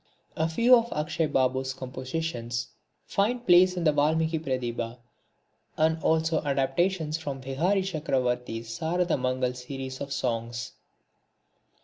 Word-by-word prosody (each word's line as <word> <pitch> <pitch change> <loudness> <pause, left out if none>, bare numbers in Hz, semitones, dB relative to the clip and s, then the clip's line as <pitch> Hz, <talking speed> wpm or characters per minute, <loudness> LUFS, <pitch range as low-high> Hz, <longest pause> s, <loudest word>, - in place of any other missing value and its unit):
A 160 +1 0
few 235 +9 +6
of 235 0 +1
Akshay 155 +1 0
Babu's 130 -1 0
compositions 130 -2 -4 0.4
find 235 +5 0
place 180 +1 +6
in 175 - -1
the 155 - +5
Valmiki 160 +2 +2
Pratibha 120 -4 -3 0.8
and 160 +1 +2
also 160 0 +2
adaptations 150 +4 0
from 140 -4 -5
Vihari 165 +10 +1
Chakravarti's 125 -9 -1
Sarada 175 +1 +1
Mangal 130 0 0
series 130 +1 -7
of 140 0 -5
songs. 120 -3 -2
145 Hz, 115 wpm, -27 LUFS, 130-165 Hz, 0.8 s, few